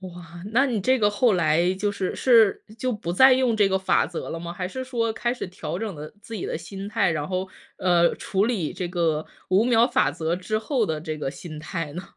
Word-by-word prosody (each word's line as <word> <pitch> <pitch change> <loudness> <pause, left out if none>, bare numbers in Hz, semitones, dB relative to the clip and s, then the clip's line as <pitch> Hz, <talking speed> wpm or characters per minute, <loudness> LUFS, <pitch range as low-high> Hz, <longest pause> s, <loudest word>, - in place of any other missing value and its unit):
哇， 175 -2 -10
那 265 +5 +4
你 240 -5 -1
这 255 +6 +2
个 205 -1 +3
后 225 +3 +3
来 170 0 +2
就 205 +2 -1
是 200 -2 -3
是 230 -5 +4 0.2
就 255 +1 -1
不 175 -5 -4
再 260 +7 +7
用 255 -3 +2
这 205 - +4
个 190 0 +1
法 190 - +2
则 175 - -6
了 165 - -4
吗？ 170 0 -6
还 180 +1 -4
是 260 +5 -5
说 235 -3 -1
开 240 +2 -1
始 250 - -5
调 180 -2 -5
整 215 -2 -4
的 150 +1 -8
自 230 +1 -9
己 - - -5
的 - - -3
心 195 +4 -8
态， 210 -3 +1
然 150 -2 -2
后， 185 +1 -3 0.3
呃， 175 -2 +3
处 195 0 0
理 215 -9 -1
这 180 - -3
个 165 -3 0 0.2
5 190 +4 +3
秒 235 -1 +4
法 135 - +2
则 160 +3 -2
之 215 +4 -2
后 240 +1 0
的 160 -5 -2
这 155 -1 -5
个 135 -3 -3
心 155 +2 -9
态 155 -1 -5
呢？ 180 - -5
190 Hz, 250 characters per minute, -24 LUFS, 170-225 Hz, 0.3 s, 再